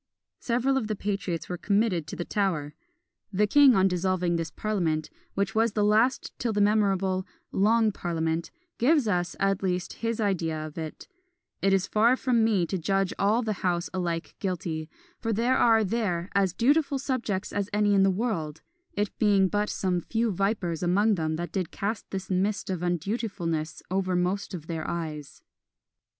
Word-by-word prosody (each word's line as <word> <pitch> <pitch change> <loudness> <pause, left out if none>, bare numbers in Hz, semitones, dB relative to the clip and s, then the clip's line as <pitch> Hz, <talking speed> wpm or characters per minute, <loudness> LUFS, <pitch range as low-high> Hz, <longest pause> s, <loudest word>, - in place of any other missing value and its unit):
Several 250 +3 +1
of 230 -5 -1
the 215 - -2
patriots 195 -5 -3
were 180 -1 -5
committed 200 -6 +1
to - - -6
the 175 - -4
Tower. 170 -8 -1 0.6
The 210 +2 +2
king 275 +3 +6
on 190 0 +4
dissolving 180 -1 0
this 165 -1 -2
parliament, 165 -7 -1 0.2
which 200 +1 0
was 225 0 +2
the 210 - +1
last 220 +5 +2
till 235 - 0
the 210 - 0
memorable 195 -3 +2 0.2
"Long 220 +2 +3
Parliament," 165 -3 -2 0.3
gives 275 0 +3
us, 175 -4 0
at 195 0 +1
least, 180 -1 -1
his 230 -1 -1
idea 175 -7 0
of 155 - -9
it: 160 -2 -7 0.5
"It 195 - +3
is 195 0 +3
far 225 +5 +3
from 250 -3 +2
me 210 -6 +2
to 190 +2 -3
judge 195 +3 0
all 215 +5 +2
the 215 -1 -1
House 175 -2 0
alike 170 -3 -2
guilty, 165 -5 -3 0.3
for 225 - -2
there 235 +4 +2
are 225 -2 +4
there 190 -4 -1
as 195 -2 +2
dutiful 285 +3 +2
subjects 235 -8 -2
as 205 0 -1
any 205 0 +2
in 195 - +4
the 195 - +5
world; 185 -7 -2 0.3
it 205 0 -2
being 200 -3 +4
but 210 +1 0
some 180 -2 -1
few 225 +4 0
vipers 195 -3 -1
among 200 +5 +3
them 160 -4 -1
that 170 0 -4
did 185 -4 -2
cast 205 +3 -4
this 190 -1 -5
mist 195 +1 0
of 185 - -2
undutifulness 175 -3 -2
over 185 -1 0
most 185 +2 -1
of 160 -3 -8
their 165 -1 -4
eyes." 155 -4 -5
195 Hz, 175 wpm, -27 LUFS, 175-215 Hz, 0.6 s, king